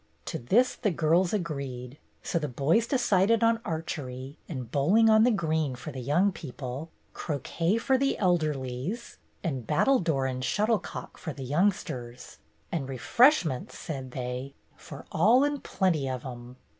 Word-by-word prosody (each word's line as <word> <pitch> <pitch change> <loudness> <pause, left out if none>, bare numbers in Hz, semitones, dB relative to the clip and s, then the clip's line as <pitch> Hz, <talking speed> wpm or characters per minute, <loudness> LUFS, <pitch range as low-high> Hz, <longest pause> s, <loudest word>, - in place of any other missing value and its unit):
To - - -4
this 225 - +3
the 215 - -1
girls 170 +1 +2
agreed, 140 - -4 0.2
so 170 - 0
the 150 - -2
boys 150 - +1
decided 230 -3 +3
on 230 0 +4
archery 145 -5 -5
and 130 -7 -6
bowling 205 +11 +4
on 220 +1 +6
the - - +5
green 160 - 0
for 140 +5 -7
the 130 - -7
young 175 +11 +2
people, 135 -1 -7 0.2
croquet 165 - -1
for 260 +3 +2
the 275 0 +1
elderlies, 155 - -1 0.3
and 135 - -3
battledore 160 - +2
and 130 -1 -3
shuttlecock 215 - -1
for 160 -4 -5
the 135 0 -7
youngsters, 130 -6 -2 0.3
and 140 -5 -2
refreshments, 160 - +2
said 135 -4 -6
they, 125 +2 -5 0.2
for - - -11
all 225 - +5
and 290 -1 -1
plenty 160 -8 0
of 130 0 -4
'em. 120 -1 -8
155 Hz, 145 wpm, -28 LUFS, 130-205 Hz, 0.3 s, on